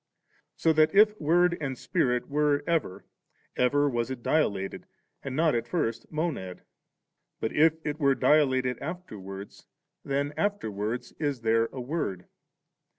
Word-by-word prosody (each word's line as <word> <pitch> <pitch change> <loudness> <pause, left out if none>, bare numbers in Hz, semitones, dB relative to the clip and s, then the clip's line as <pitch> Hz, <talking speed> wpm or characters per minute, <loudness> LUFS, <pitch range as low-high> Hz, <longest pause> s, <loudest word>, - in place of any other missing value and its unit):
So 160 - +2
that 155 +4 +3
iT 210 0 +5
Word 175 +3 +3
and 135 -3 -3
Spirit 125 0 0
were 145 0 +1
ever, 160 - -1 0.5
ever 145 +3 +3
was 120 -3 -1
it 130 -3 -6
dilated, 100 -11 0 0.3
and 135 -1 -5
not 160 +1 +3
at 115 - -1
first 115 -10 -2
a - - -32
Monad; 150 - -3 0.8
but 110 - -2
if 160 +1 +5
it 150 0 -3
were 140 -2 +3
dilated 130 -5 +2
after 170 - -6
wards, 95 +1 -10 0.4
then 140 +1 -1
afteiwards 115 - -2
is 145 -5 -1
there 115 0 +2
a 130 - -9
Word. 120 - -3
140 Hz, 145 wpm, -28 LUFS, 115-155 Hz, 0.8 s, iT